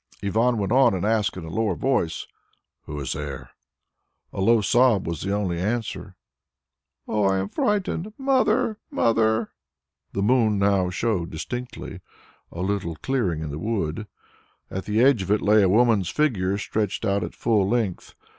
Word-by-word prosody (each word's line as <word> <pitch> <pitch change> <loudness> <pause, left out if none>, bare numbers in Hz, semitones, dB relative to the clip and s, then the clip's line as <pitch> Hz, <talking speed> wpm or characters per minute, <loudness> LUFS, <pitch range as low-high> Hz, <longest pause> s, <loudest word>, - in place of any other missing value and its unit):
Ivan 115 +4 +2
went 100 -1 -2
on 125 -4 +5
and 95 - -2
asked 105 -3 +1
in 85 - -6
a 80 - -8
lower 105 0 0
voice, 125 -10 -1 0.6
"Who 75 0 -6
is 70 - -3
there?" 70 -2 -6 0.8
A - - -3
low 115 +2 +4
sob 120 -1 +3
was 85 -2 -4
the 100 - -2
only 100 -4 -1
answer, 105 -1 -3 0.9
"Oh, 105 -1 0
I 95 0 +2
am 95 +1 -2
frightened. 205 - -1
Mother! 255 -4 +1
Mother!" 110 - +1 0.6
The 100 - -1
moon 110 -2 +3
now 100 -2 +2
showed 90 -3 -1
distinctly 120 +10 -6 0.5
a 85 - -6
little 95 -4 -2
clearing 90 - -1
in 75 - -5
the 75 - -5
wood. 105 -1 -2 0.6
At 95 - -4
the 105 +2 +1
edge 130 -5 +4
of 95 - -5
it 105 +1 +2
lay 105 +1 +5
a 95 - +4
woman's 110 -3 +3
figure 100 -9 0
stretched 105 +1 -2
out 100 -1 +1
at - - -6
full 105 -4 +1
length. 110 -6 -2
105 Hz, 165 wpm, -24 LUFS, 95-120 Hz, 0.9 s, on